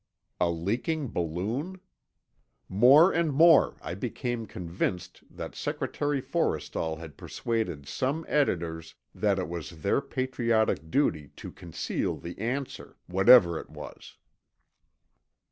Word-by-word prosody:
A 85 - +2
leaking 115 - -2
balloon? 110 - -3 0.9
More 135 - +6
and 165 -2 +1
more, 165 +4 +5
I 85 - -4
became 115 +3 -4
convinced 90 0 -4
that - - -7
Secretary 145 -1 -2
Forrestal 80 -1 -1
had 80 -2 -10
persuaded 90 -12 -3
some 140 - -2
editors 80 - -1 0.2
that 100 -2 +1
it 95 - -2
was 85 -1 -7
their 100 - +2
patriotic 120 -9 0
duty 80 - +1
to - - -9
conceal 85 -3 -3
the 85 - -8
answer, 130 +5 -4
whatever 95 -2 +6
it - - -11
was. - - -11
110 Hz, 110 wpm, -28 LUFS, 85-135 Hz, 0.9 s, More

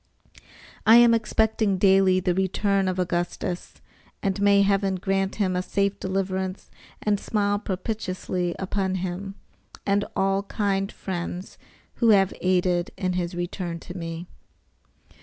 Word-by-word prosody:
I 225 - +7
am 240 -1 +7
expecting 220 -2 +1
daily 190 -1 +4
the 180 -1 0
return 190 +1 +1
of 185 0 -1
Augustus, 175 +1 -2 0.5
and 195 0 -1
may 200 0 +5
Heaven 195 -1 +1
grant 195 +1 -1
him 190 -3 0
a 180 - +1
safe 200 +1 -1
deliverance 190 0 -3 0.3
and 205 -1 +1
smile 205 -1 0
propitiously 185 -3 -3
upon 190 0 -1
you 190 +2 -4 0.5
and 200 0 +2
all 195 0 +2
kind 200 -1 -1
friends 180 0 -5 0.4
who 235 - +3
have 195 -3 +5
aided 180 -1 +1
in 185 -1 -1
his 175 0 -2
return 175 -1 -4
to 175 - -9
me. 165 -1 -5
190 Hz, 130 wpm, -25 LUFS, 180-200 Hz, 0.5 s, I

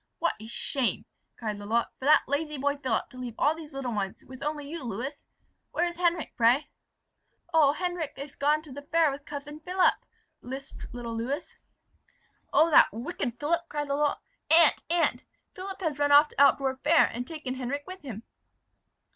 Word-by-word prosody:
"What 340 - +1
a 220 - -9
shame," 245 +2 -1 0.3
cried 215 -3 -4
Lalotte, 225 +3 0
"for 260 - -6
that 300 - +6
lazy 300 +2 -1
boy 285 +1 0
Philip, 260 -5 -1
to 255 - -11
leave 245 -3 -6
all 295 - +3
these 320 -1 -10
little 270 -3 -4
ones, 195 -2 -4
with 260 +1 -11
only 295 -1 -3
you, 320 0 -6
Lewis. 245 +6 -5 0.5
Where 345 - +2
is 345 -1 -4
Henric, 345 -2 0
pray?" 240 +5 +3 0.8
"Oh! 295 -3 +5
Henric 350 -5 -3
is 280 0 -7
gone 300 +2 +2
to 305 - -13
the 285 +2 -7
fair 320 +1 +2
with 280 +1 -8
cousin 295 +1 -7
Philip," 360 +3 +3 0.5
lisped 265 +2 -8
little 235 -1 -5
Lewis. 250 +6 -3 1.0
"Oh 325 +2 +4
that - - +7
wicked 245 - -4
Philip!" 340 +3 0
cried 295 -1 -3
Lalotte. 290 +1 +1 0.3
"Aunt! 325 0 +7
aunt! 340 0 +1 0.3
Philip 385 0 -7
has 310 -5 -2
run 290 0 +2
off 295 +1 +7
to - - -1
Altdorf 270 -1 +3
fair, 310 +4 +5
and 245 +2 -4
taken 305 -6 -5
Henric 265 +3 -4
with 370 0 -9
him!" 230 -6 -7
285 Hz, 180 wpm, -28 LUFS, 255-315 Hz, 1.0 s, that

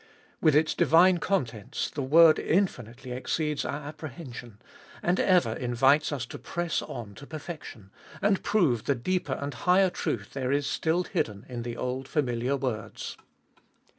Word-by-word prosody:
With 155 -3 +4
its 155 +1 +3
divine 175 +2 +5
contents 120 - -2
the 145 - -4
word 155 +4 +6
infinitely 130 - -1
exceeds 150 +4 -1
our 145 +1 -4
apprehension, 135 -7 -9 0.4
and 175 +2 +2
ever 175 - +3
invites 130 +6 +2
us 135 -4 -3
to - - -9
press 175 -2 -2
on 110 -4 -7
to 140 +8 -12
perfection, 150 - -8 0.3
and 200 -1 +2
prove 150 - +2
the 140 - +2
deeper 165 +2 -1
and 140 +1 -4
higher 185 0 +3
truth 105 -10 -3
there 130 -1 -2
is 140 0 +1
still 165 +5 0
hidden 105 - -3
in 120 -2 -5
the 120 0 -5
old 130 +1 -3
familiar 130 -2 0
words. 125 -6 -4
140 Hz, 150 wpm, -28 LUFS, 120-165 Hz, 0.4 s, word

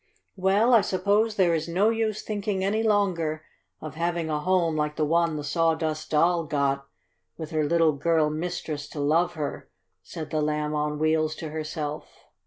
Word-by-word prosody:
"Well, 200 +5 +3
I 230 - +7
suppose 205 +4 +1
there 180 -4 +3
is 160 0 -1
no 190 +6 +2
use 220 -2 -1
thinking 205 -2 -2
any 210 +3 +1
longer 175 -8 0 0.3
of 155 -2 -7
having 170 0 -2
a 150 - 0
home 175 -1 +1
like 150 0 -1
the 155 - +1
one 165 +1 +2
the 150 - -4
Sawdust 160 0 0
Doll 165 +2 +2
got, 140 -2 -1 0.5
with 160 -1 -7
her 155 -1 +1
little 165 +1 +3
girl 155 +1 +1
mistress 155 -2 -4
to 150 - -7
love 165 +5 +2
her," 150 -2 -5 0.3
said 155 - -8
the 155 -1 0
Lamb 150 0 -1
on 150 0 -1
Wheels 155 0 +1
to 160 - -6
herself. 155 -1 -4
160 Hz, 175 wpm, -26 LUFS, 150-185 Hz, 0.5 s, I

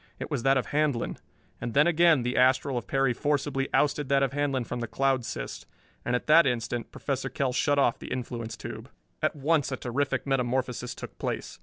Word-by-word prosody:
It - - -6
was - - -1
that 135 +2 +4
of 130 - 0
Handlon. 145 -5 0 0.4
And 120 -1 -4
then 150 +2 +6
again 170 -5 +4
the 125 +1 -1
astral 130 +1 +3
of 120 -2 -3
Perry 135 -2 +2
forcibly 140 0 -1
ousted 145 -1 +1
that 140 0 +3
of 135 - +1
Handlon 140 -3 0
from 120 +1 -5
the 120 - -3
cloud 130 +3 +1
cyst. - - -6 0.4
And 120 - 0
at 125 - -2
that 155 0 +6
instant 120 -1 -2
Professor 135 -1 -3
Kell 130 0 -1
shut 145 +3 +2
off 135 -4 +2
the - - -9
influence 120 -2 -4
tube. - - -8 0.3
At - - +1
once 145 0 +1
a 130 - -2
terrific 135 +3 -1
metamorphosis 125 -2 -1
took - - -10
place. - - -4
135 Hz, 200 wpm, -27 LUFS, 125-145 Hz, 0.4 s, then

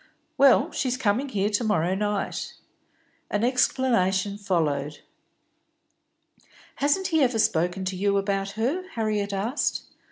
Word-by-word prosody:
"Well, 275 -3 +5
she's 255 -1 -1
coming 255 +3 0
here 205 -2 0
to 205 +3 0
morrow 180 -5 +1
night." 205 +1 -2 0.7
An 205 +1 -1
explanation 230 -6 +1
followed. 150 -7 -1 1.8
"Hasn't 320 +7 +1
he 320 -2 +2
ever 250 -4 +2
spoken 190 -3 +1
to 185 0 -2
you 200 +2 +1
about 195 0 -1
her?" 320 +12 -1
Harriet 210 -3 -1
asked. 210 +8 -1
205 Hz, 120 wpm, -25 LUFS, 195-250 Hz, 1.8 s, Well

